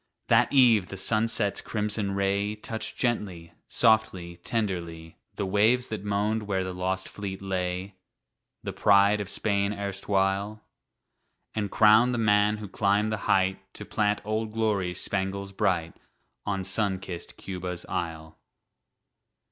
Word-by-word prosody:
That - - +4
eve 120 -8 +5
the 100 - -7
sunset's 110 +1 +1
crimson 105 -2 -1
ray 100 +1 0
Touched 110 0 -6
gently, 95 -9 -2
softly, 110 -7 +2
tenderly 85 -6 -4 0.2
The 100 - -2
waves 110 +6 +2
that 110 -3 -5
moaned 105 +1 -1
where 95 -2 0
the 95 0 -4
lost 95 +1 -2
fleet 100 -2 -6
lay, 95 0 -3 0.7
The - - -4
pride 100 +1 +4
of 100 - -5
Spain 100 -1 0
erstwhile, 100 +1 -1 0.9
And 105 -2 -2
crowned 110 +5 +5
the - - -2
man 105 -1 +3
who 105 -1 -7
climbed 100 +2 +1
the 110 - -1
height 95 0 +3 0.2
To - - -8
plant 105 0 0
"Old 110 0 -2
Glory's" 100 -6 0
spangles 100 0 -2
bright 90 -5 0 0.5
On 95 -2 -1
sun 95 +1 0
kissed 90 -2 -7
Cuba's 90 -2 -5
Isle. 80 -2 -5
100 Hz, 130 wpm, -27 LUFS, 95-105 Hz, 0.9 s, eve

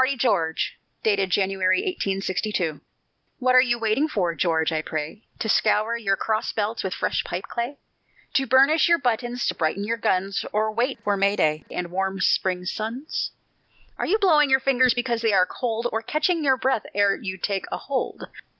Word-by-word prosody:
TARDY 260 +1 +2
GEORGE 165 -10 0 0.5
[January, 190 -1 +2
1862] 195 - -2 0.6
What 255 -2 +2
are 255 - +8
you 240 -2 +1
waiting 230 +6 +1
for, 180 - -1
George, 165 -1 +1
I 155 -1 0
pray? 155 +6 -5 0.2
To - - -3
scour 215 +1 +2
your 205 -4 0
cross 215 +2 -1
belts 220 +1 -2
with 190 -1 -3
fresh - - -1
pipe 175 +2 -4
clay? 240 +4 -4 0.6
To 270 -1 +1
burnish 275 +7 +5
your 340 - +5
buttons, 245 -2 -1
to - - +1
brighten 170 +4 -1
your 230 +3 -1
guns; 195 -2 0
Or 215 +1 0
wait 250 +4 0
you - - -33
for 205 -1 +1
May 200 +1 +2
day 155 -3 0
and 175 -1 -4
warm 190 +1 -2
spring 180 -1 +1
suns? 230 - -3 0.7
Are - - -1
you 420 - +3
blowing 310 -9 +4
your 265 0 +5
fingers 260 -2 +3
because 240 -2 -1
they 225 -2 +2
are 185 -2 +5
cold, 230 +2 -3
Or 225 - -1
catching 310 +7 0
your 265 -2 +3
breath 255 -3 0
ere 200 -1 +3
you 190 -3 -6
take 195 +1 -2
a - - -2
hold? 270 -2 -3
220 Hz, 185 wpm, -24 LUFS, 190-255 Hz, 0.7 s, are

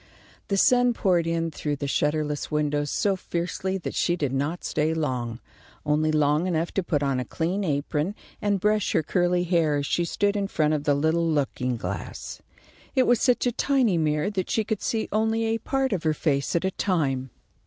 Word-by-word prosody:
The 200 - 0
sun 245 +3 +4
poured 175 -6 +2
in 165 0 -1
through 150 -1 -3
the 140 - -4
shutterless 150 +1 -1
windows 150 -1 0
so 200 +6 +1
fiercely 185 +1 -3
that 180 - -5
she 175 - +1
did 145 -6 -2
not 145 +6 -2
stay 155 +1 0
long, 125 -7 -2 0.5
only 155 +1 +2
long 150 +2 +2
enough 170 -1 -1
to 195 - 0
put 145 -4 0
on 135 -2 0
a - - -1
clean 175 - -2
apron 150 +3 -1 0.3
and 205 -1 +1
brush 210 +1 +1
her - - +2
curly 175 +1 +1
hair, 165 -4 +2
as 145 0 -1
she 175 - 0
stood 200 +4 0
in 200 -1 0
front 155 -5 +1
of 150 -1 -2
the 145 - +3
little 160 +3 +1
looking 130 -5 -1
glass. 95 -3 -6 0.5
It 260 - +5
was 245 -2 +3
such 250 -1 +3
a 245 - +2
tiny 245 -7 +2
mirror 150 +5 +1
that 190 -3 -2
she 220 - +1
could 215 -1 -3
see 225 -1 -1
only 220 +1 +1
a 225 0 0
part 270 -2 0
of 185 - -1
her 155 -2 +1
face 140 -2 0
at 170 - +1
a 190 - +1
time. 140 -10 -1
165 Hz, 200 wpm, -25 LUFS, 150-195 Hz, 0.5 s, It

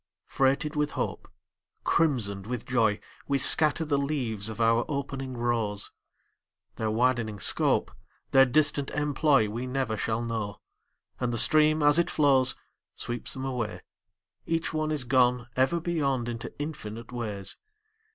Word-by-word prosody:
Freighted 140 +3 0
with 150 0 -1
hope, - - -4 0.6
Crimsoned 110 - 0
with 125 -2 -4
joy, 110 -5 +1 0.3
We 140 - +1
scatter 155 +3 +5
the 145 -2 0
leaves 125 -8 -2
of 110 - -8
our 115 +1 +3
opening 135 -3 -4
rose; 115 -4 -2 0.9
Their 110 - -1
widening 115 -2 0
scope, - - +2 0.4
Their 135 0 +6
distant 145 +1 +2
employ, 145 -4 +2
We 120 +5 -5
never 130 -3 -2
shall 110 +2 -2
know. 110 -3 -4 0.6
And 125 -1 -1
the 115 - -1
stream 155 +4 +4
as 145 +2 +5
it 170 - +1
flows 135 -4 +3 0.4
Sweeps 120 -1 -5
them 130 0 -5
away, 125 -5 -4 0.7
Each 165 0 -1
one 155 0 -1
is 150 -4 -1
gone 125 -1 +2
Ever 135 +7 +2
beyond 140 -8 -1
into 115 -1 -5
infinite 115 -7 -7
ways. 105 -5 -4
130 Hz, 140 wpm, -27 LUFS, 115-145 Hz, 0.9 s, Their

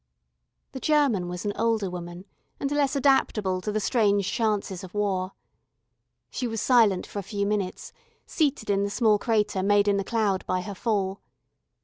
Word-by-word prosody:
The 265 - -7
German 260 - +2
was 180 +3 -6
an 205 - -1
older 225 -3 0
woman, 175 0 -7 0.3
and 275 - -2
less 290 -1 +1
adaptable 215 -9 +2
to 210 - -3
the 215 - 0
strange 205 -3 +1
chances 205 -5 -1
of 185 +1 -11
War. 195 -2 -1 1.0
She 250 - -3
was 225 -1 -3
silent 225 -7 +3
for 205 - -6
a - - -3
few 200 +1 -3
minutes, 200 -3 -3 0.3
seated 280 -9 0
in 200 0 +2
the 200 - 0
small 215 -1 +2
crater 210 -4 0
made 205 +1 +3
in 200 -1 +3
the 200 - -1
cloud 205 -3 0
by 185 - 0
her 200 +2 -6
fall. 195 -2 -1
205 Hz, 170 wpm, -26 LUFS, 190-225 Hz, 1.0 s, silent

